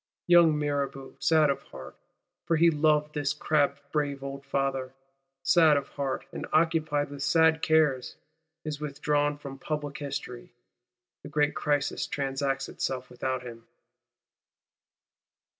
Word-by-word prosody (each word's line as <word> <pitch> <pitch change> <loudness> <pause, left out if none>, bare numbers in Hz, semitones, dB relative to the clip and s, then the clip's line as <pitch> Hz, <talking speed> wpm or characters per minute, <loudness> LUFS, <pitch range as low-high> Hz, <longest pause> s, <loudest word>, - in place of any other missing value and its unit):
Young 170 -3 +6
Mirabeau, 140 -2 -3
sad 155 -3 +4
of 135 0 -4
heart, 65 - -11 0.5
for 165 - +3
he 165 +1 +5
loved 150 0 +2
this 145 -1 -1
crabbed 145 -2 +1
brave 140 -2 -1
old 140 0 -6
Father, 135 -1 -2 0.5
sad 160 -4 +5
of 140 -1 -4
heart, 140 -2 -3
and - - -6
occupied 155 -3 +1
with 140 -1 -8
sad 160 +1 +3
cares,—is 155 +1 -1
withdrawn 145 0 0
from 140 -2 -9
Public 145 -1 -4
History. 125 -5 -6 0.7
The 145 - -10
great 150 0 +1
crisis 145 -1 -1
transacts 135 0 -2
itself 130 -1 -4
without 130 +1 -3
him. 115 -2 -10
145 Hz, 125 wpm, -28 LUFS, 135-155 Hz, 0.7 s, Young